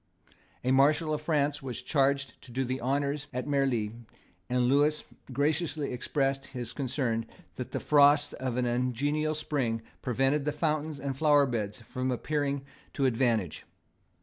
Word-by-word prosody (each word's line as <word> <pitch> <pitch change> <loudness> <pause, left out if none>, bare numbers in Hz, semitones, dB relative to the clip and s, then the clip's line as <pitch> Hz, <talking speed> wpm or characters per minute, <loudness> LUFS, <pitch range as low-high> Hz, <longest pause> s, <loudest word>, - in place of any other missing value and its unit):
A 130 - +1
Marshal 150 +4 +4
of 150 - -2
France 150 -2 +1
was 130 -3 -5
charged 135 -2 +1
to 125 - -14
do 130 +2 -1
the 130 +1 -3
honours 140 +3 -1
of 125 0 -2
Marli; 135 -7 +1 0.6
and 125 0 +2
Lewis 145 +4 +3 0.3
graciously 150 +1 0
expressed 135 +2 -1
his 125 -3 -6
concern 125 -4 -1 0.3
that 125 - -5
the - - -2
frosts 145 0 +5
of 130 -2 -3
an 125 - +1
ungenial 135 +6 0
spring 125 -7 -1 0.2
prevented 135 +4 +1
the 150 - 0
fountains 155 -1 -1
and 135 -1 -3
flower 145 0 +5
beds 110 -3 -3
from 130 +3 -3
appearing 140 +2 -1 0.3
to 135 - 0
advantage. 115 - +1
135 Hz, 150 wpm, -29 LUFS, 125-145 Hz, 0.6 s, frosts